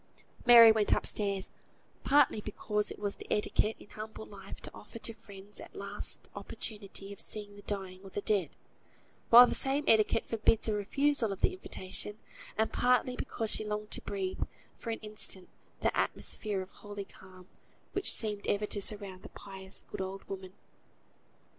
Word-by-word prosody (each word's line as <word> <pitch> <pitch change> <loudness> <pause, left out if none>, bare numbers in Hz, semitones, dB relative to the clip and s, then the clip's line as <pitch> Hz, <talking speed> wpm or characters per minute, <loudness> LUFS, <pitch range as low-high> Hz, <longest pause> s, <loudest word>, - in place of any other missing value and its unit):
Mary 230 -2 +11
went 220 -1 +3
up - - -2
stairs: 200 -2 +1 0.5
partly 275 -6 +5
because 210 0 -1
it - - -6
is 205 -1 -2
the - - -10
etiquette 210 +1 +2
in - - -14
humble 220 0 -7
life 195 -2 -10
to - - -10
offer 220 - -10
to 230 0 -4
friends 200 -2 -7
a - - -9
last - - -3
opportunity 200 -2 -6
of 200 - -14
seeing 205 -1 -7
the 205 - -11
dying 190 -3 -4
or 195 - -9
the 205 - -3
dead, 200 -4 +1 0.8
while 240 +2 +11
the - - -1
same 275 +2 +1
etiquette 220 0 +4
forbids 225 0 +2
a 215 - +2
refusal 235 +3 +2
of 195 - -5
the 380 - +3
invitation; 210 - -5 0.4
and 220 +1 +1
partly 250 0 +3
because 225 -3 -2
she - - +2
longed 210 0 -4
to - - 0
breathe, 190 -2 -3 0.3
for 230 - -7
an 225 - -1
instant, 210 -3 0 0.3
the - - +2
atmosphere 205 -3 -1
of 185 - -15
holy 205 -1 -7
calm, 185 -1 -15 0.4
which 395 - +1
seemed 210 -2 0
ever 205 +1 +1
to 205 -1 -3
surround 200 -2 -1
the - - -10
pious 190 -1 -7
good - - -4
old 190 +1 -5
woman. 190 -1 -7
210 Hz, 170 wpm, -32 LUFS, 195-220 Hz, 0.8 s, Mary